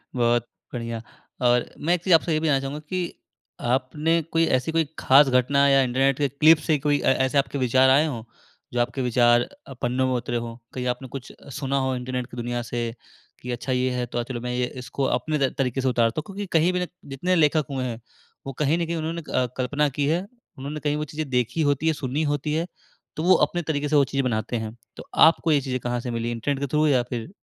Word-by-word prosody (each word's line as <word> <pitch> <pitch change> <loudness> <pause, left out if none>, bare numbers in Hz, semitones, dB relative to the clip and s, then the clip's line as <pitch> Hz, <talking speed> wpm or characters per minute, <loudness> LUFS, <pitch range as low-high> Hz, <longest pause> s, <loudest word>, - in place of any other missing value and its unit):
बहुत 120 -1 +2 0.3
बढ़िया। 115 -2 -4 0.4
और 120 -1 +3
मैं 170 +4 +1
एक 175 - -1
चीज़ 185 - +3
आपसे 165 0 +2
ये 155 - +2
भी 160 - -1
जानना 140 -3 +3
चाहूँगा 135 +2 -5
कि 180 -2 -2 0.5
आपने 145 +7 +1
कोई 165 0 +3
ऐसी 130 +1 0
कोई 165 0 +2
ख़ास 140 +2 +6
घटना 135 +2 +3
या 135 -1 +5
इंटरनेट 130 +1 +2
के 145 - +2
क्लिप 155 +4 +6
से 155 -2 +3
कोई 145 0 +1
ऐ - - +3
ऐसे 135 +2 0
आपके 140 +1 +1
विचार 130 0 +4
आए 140 +4 +5
हों 120 -7 -5 0.5
जो 125 - 0
आपके 120 +2 -2
विचार 120 -1 +4 0.3
अ, - - -8
पन्नों 125 +2 +1
में 130 - 0
उतरे 120 -1 -2
हो। 115 0 -5 0.2
कहीं 125 -1 -4
आपने 125 +2 -3
कुछ 130 -3 -7 0.3
सुना 140 -1 -1
हो 130 -1 0
इंटरनेट 125 0 -4
की 120 - -10
दुनिया 120 0 -2
से 120 0 -3 0.6
कि 125 - -5
अच्छा 120 +2 -4
ये 130 0 +1
है 125 -1 -1
तो 120 0 -4
आज 120 - -2
चलो 120 -1 -5
मैं 125 0 -3
ये 125 0 0 0.2
इसको 140 - -4 0.2
अपने 155 +4 -2
त 135 -2 +2
तरीके 135 -1 0
से 130 - 0
उतारता 120 +2 +1
हूँ। - - -19
क्योंकि 200 0 -6
कहीं 165 +3 +3
भी 180 - 0
ना 180 - -1 0.2
जितने 175 +7 0
लेखक 155 -2 +3
हुए 130 -2 -2
हैं 120 -2 -4 0.5
वो 135 - -4
कहीं 150 +3 +2
न 170 - -1
कहीं 170 +1 -3
उन्होंने 165 +1 -3
अ, 130 - +2
कल्पना 145 +3 +1
की 145 -1 +1
है। 170 +5 0 0.3
उन्होंने 140 +3 -5
कहीं 145 -1 -1
वो 150 - -2
चीज़ें 155 0 -5
देखी 125 +4 0
होती 145 +3 -1
है, 160 - +4
सुनी 140 +2 -2
होती 145 +1 -2
है 165 +2 0 0.5
तो 155 - -3
वो 185 +2 +6
अपने 175 - -3
तरीके 150 -2 -2
से 150 - +1
वो 145 - +6
चीज़ें 135 +1 -1
बनाते 115 0 -1
हैं। 110 0 -5 0.2
तो - - -8 0.2
आपको 165 0 +2
ये 145 -2 +3
चीज़ें 130 -1 -3
कहाँ 120 0 -2
से 120 0 -5
मिली 115 0 -2
इंटरनेट 135 +4 -2
के 140 - -2
थ्रू 150 +3 +2
या 130 -4 +3
फ़िर 120 0 -5
135 Hz, 245 wpm, -24 LUFS, 125-150 Hz, 0.6 s, ख़ास